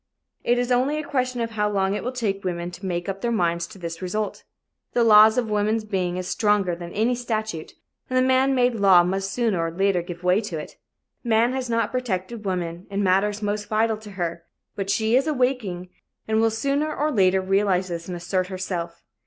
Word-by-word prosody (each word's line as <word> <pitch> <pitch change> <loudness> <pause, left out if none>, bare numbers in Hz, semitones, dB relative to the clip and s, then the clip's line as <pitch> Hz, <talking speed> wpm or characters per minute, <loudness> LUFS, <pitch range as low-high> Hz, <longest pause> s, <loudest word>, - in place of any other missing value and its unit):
It 240 - +2
is 245 0 -1
only 260 +5 +2
a 305 - -3
question 255 -3 -1
of 230 0 -2
how 210 -1 0
long 195 -1 +1
it 210 - -3
will 250 - -2
take 210 -6 -2
women 175 -1 -3
to 180 +2 -7
make 175 0 -2
up 195 0 -4
their 235 - 0
minds 170 -5 0
to - - -13
this 170 -2 -6
result. 205 +3 -3 0.5
The 240 - +3
law 215 -1 +8
of 225 +1 0
woman's 215 +1 +1
being 185 -4 -2
is 185 0 -4
stronger 205 -5 +1
than 170 0 -8
any 225 +4 +1
statute, 220 -8 -3 0.4
and 255 - 0
the 255 0 +3
man 260 +1 +3
made 250 -1 +3
law 195 -5 +6
must 195 +2 -2
sooner 220 -8 0
or 165 - -1
later 190 +1 +1
give 175 0 -9
way 180 +4 +3
to 195 -7 -5
it. 150 - -8 0.5
Man 235 +1 +2
has 260 -2 -3
not 230 -2 0
protected 230 -3 -3
woman 175 -1 -3
in 200 0 -1
matters 200 +3 +1
most 205 0 -2
vital 220 +1 +1
to 210 -1 -11
her 170 -1 -3 0.3
but 195 -1 -4
she 220 +3 +2
is 270 +4 +3
awaking 250 - -1 0.4
and 220 0 +2
will 225 - +4
sooner 280 +7 -1
or 305 +1 0
later 190 -6 +3
realize 190 -1 +1
this 170 -1 -5
and 180 -1 -4
assert 180 +1 -1
herself. 180 -3 -5
205 Hz, 210 wpm, -24 LUFS, 180-235 Hz, 0.5 s, law